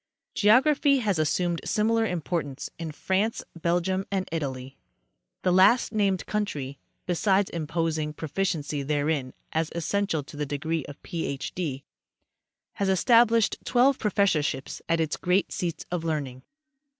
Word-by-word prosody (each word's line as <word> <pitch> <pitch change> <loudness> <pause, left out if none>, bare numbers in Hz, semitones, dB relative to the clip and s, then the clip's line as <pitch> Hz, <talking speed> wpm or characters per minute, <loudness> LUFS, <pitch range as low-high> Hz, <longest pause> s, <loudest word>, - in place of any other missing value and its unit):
Geography 275 +6 +4
has 205 -9 0
assumed 170 +2 0
similar 225 +1 +1
importance 160 -5 -3
in 165 -2 -4
France, 190 +8 -1
Bel 170 +1 +1
gium 190 +2 -2
and 190 -2 -1
Italy. 135 -4 -4 0.7
The 180 - +3
last 200 +7 +5
named 200 -3 +1
country, 145 -11 -3 0.3
besides 190 +2 +2
imposing 160 -1 -2
pro 160 - -6
ficiency 150 -4 -1
therein 145 -2 -1 0.2
as 160 0 0
essential 170 -2 0
to 140 - -12
the 150 0 -2
degree 155 +3 -2
of 145 - -10
Ph. 150 -5 -4
D., 145 -7 -3 0.9
has 200 -1 +1
estab 230 +5 +5
lished 230 -1 +2
twelve 260 +2 +3
professorships 170 -10 0
at 165 0 +2
its 160 -2 0
great 180 +2 +1
seats 170 -3 -3
of 175 -2 -2
learning. 145 -6 -3
170 Hz, 140 wpm, -26 LUFS, 150-200 Hz, 0.9 s, last